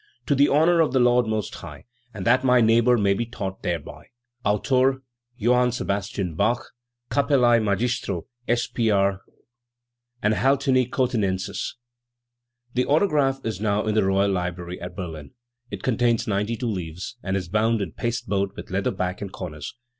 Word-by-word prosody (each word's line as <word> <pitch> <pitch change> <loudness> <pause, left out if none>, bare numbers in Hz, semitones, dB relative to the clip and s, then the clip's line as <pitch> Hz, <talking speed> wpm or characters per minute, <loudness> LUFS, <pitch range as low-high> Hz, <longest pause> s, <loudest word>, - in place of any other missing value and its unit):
To 145 - +2
the 140 +1 +4
honour 165 +4 +4
of 155 -5 +1
the 130 - +3
Lord 120 -1 +4
Most 110 -2 -2
High, - - -10 0.3
and 100 -5 -7
that 130 +3 +4
my 125 -1 +5
neighbour 115 +2 +4
may 100 -2 +3
be 115 +4 -2
taught 95 -5 -6
thereby. 85 -4 -5 0.4
Autore 130 +5 +2 0.4
Joanne 125 +2 +3
Sebast. 100 -5 -3 0.2
Bach. 115 +8 +2
p. 120 - -14
t. 120 0 -14
Capellae 130 -5 +4
Magistro 110 -3 -1 0.2
S. 120 0 +1
P. 115 -2 -1
R. 100 -1 +2 1.0
Anhaltini 130 +3 +2
Cothinensis." 105 -8 -1 1.0
The 125 +1 0
autograph 145 -4 +2
is 110 -3 -3
now 105 0 +1
in 110 - 0
the 110 -1 +3
Royal 95 +1 +2
Library 90 -1 -4
at 90 +1 -7
Berlin. 80 -6 -7 0.4
It - - -7
contains 120 -2 +1
ninety 105 +2 -1
two 125 - -4
leaves, 90 +4 -6
and 95 0 -1
is 90 -2 -4
bound 110 +4 +1
in 95 -5 -3
paste 120 - -3
board 100 0 -1
with - - -9
leather 95 +1 0
back 90 -1 -3
and 100 -2 -5
corners. 75 - -7
110 Hz, 165 wpm, -24 LUFS, 95-125 Hz, 1.0 s, my